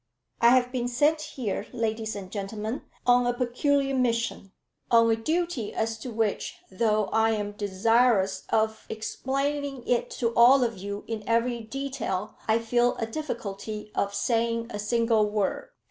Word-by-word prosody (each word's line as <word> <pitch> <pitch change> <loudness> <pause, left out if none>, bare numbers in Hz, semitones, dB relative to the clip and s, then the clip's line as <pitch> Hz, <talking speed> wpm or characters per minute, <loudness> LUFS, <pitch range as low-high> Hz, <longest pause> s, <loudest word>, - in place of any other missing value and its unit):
"I 235 - +7
have 250 0 +4
been 245 -2 -1
sent 295 +6 +2
here, 250 -9 -4
ladies 220 -2 -2
and 190 -2 -7
gentlemen, 215 +4 -4 0.2
on 245 0 +4
a 245 - +1
peculiar 270 +3 +1
mission, 230 -6 0 0.4
on 230 -1 +5
a - - +4
duty 310 -1 -2
as 225 0 -1
to 250 - -6
which, 220 -2 -1
though 215 +1 +2
I 225 0 +3
am 205 -1 -2
desirous 205 0 +2
of 220 0 0
explaining 275 +4 -3
it 245 - +1
to 230 -2 0
all 250 +3 +7
of 230 -2 -1
you 200 +1 -5
in 225 -2 -4
every 235 +1 +1
detail, 225 -5 -4
I 220 0 +4
feel 240 +1 +2
a 225 - -2
difficulty 215 -5 -5
of 200 0 -1
saying 230 +1 0
a 205 - -4
single 225 0 +2
word." 210 - -1
230 Hz, 155 wpm, -27 LUFS, 215-245 Hz, 0.4 s, I